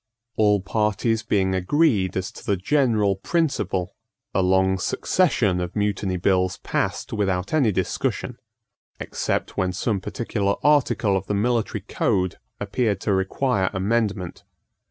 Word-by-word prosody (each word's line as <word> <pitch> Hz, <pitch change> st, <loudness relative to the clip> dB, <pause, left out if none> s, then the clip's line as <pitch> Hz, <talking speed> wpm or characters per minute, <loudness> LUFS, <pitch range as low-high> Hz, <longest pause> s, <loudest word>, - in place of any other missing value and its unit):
All 105 Hz, -2 st, +3 dB
parties 105 Hz, +2 st, 0 dB
being 95 Hz, -3 st, +1 dB
agreed 95 Hz, -, +2 dB
as 95 Hz, +1 st, -3 dB
to -, -, -12 dB
the 100 Hz, -, 0 dB
general 110 Hz, -3 st, +2 dB
principle, 100 Hz, -, -1 dB, 0.4 s
a 95 Hz, -, +2 dB
long 95 Hz, +1 st, +2 dB
succession 110 Hz, -, +1 dB
of 90 Hz, 0 st, -4 dB
Mutiny 100 Hz, -3 st, -1 dB
Bills 95 Hz, 0 st, +1 dB
passed -, -, -2 dB
without 95 Hz, -1 st, -1 dB
any 135 Hz, -8 st, +3 dB
discussion, -, -, -2 dB, 0.6 s
except -, -, -3 dB
when 95 Hz, -1 st, +1 dB
some 100 Hz, +1 st, -1 dB
particular 100 Hz, -2 st, -1 dB
article 140 Hz, -8 st, +3 dB
of 95 Hz, 0 st, -2 dB
the 105 Hz, -, 0 dB
military 115 Hz, +2 st, 0 dB
code 95 Hz, -1 st, -1 dB, 0.2 s
appeared 105 Hz, 0 st, 0 dB
to 100 Hz, -, 0 dB
require 95 Hz, +2 st, 0 dB
amendment. 100 Hz, -2 st, -1 dB
100 Hz, 130 wpm, -23 LUFS, 95-115 Hz, 0.6 s, All